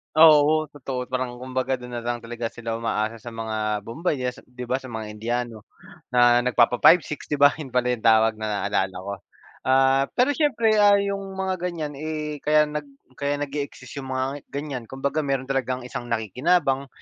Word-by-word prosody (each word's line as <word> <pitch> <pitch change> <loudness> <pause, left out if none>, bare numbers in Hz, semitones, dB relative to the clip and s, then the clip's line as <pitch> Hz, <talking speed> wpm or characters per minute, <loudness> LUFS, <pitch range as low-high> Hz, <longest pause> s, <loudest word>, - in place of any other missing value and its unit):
Oo, 155 -1 +7
totoo. 130 -3 -5
Parang 130 -1 -2
kumbaga 130 +1 -2
do'n 125 -1 -10
na 120 - -3
lang 120 0 -3
talaga 115 0 -4
sila 115 -1 -5
umaasa 115 0 -2
sa 120 -1 -9
mga 110 -2 -2
bombay 155 +8 -2
diyan 125 -1 -2
sa - - -15
di 125 0 -8
ba, 130 +2 -1
sa 130 - -10
mga 110 -2 -6
Indiano 115 0 -4 0.4
na 120 -1 +5
nagpapa 125 0 +2
5-6 165 -3 +4
di 150 - -1
ba, 145 0 +6
'yun 145 - -5
pala 125 0 +1
'yung 120 - -2
tawag 110 0 +4
na 105 -3 -2
naalala 95 -2 0
ko. 95 +2 -5 0.5
Ah, 135 +1 +4
pero 255 +4 +3
siyempre, 265 -7 +2
ah, 205 0 +7
'yung 200 0 0 0.2
mga 190 -1 -2
ganiyan, 165 -5 -3
eh, 155 -1 -4
kaya 150 +1 +4
nag 150 -1 -4 0.3
kaya 140 0 0
nag-e-exist 140 -1 -6
'yung 135 - -7
mga 130 0 -1 0.2
ganiyan 140 -4 -5
kumbaga 140 +3 -2
meron 135 -2 -1
talagang 130 -1 -1
isang 120 -1 -6
nakikinabang, 135 - +1
130 Hz, 185 wpm, -24 LUFS, 120-150 Hz, 0.5 s, Oo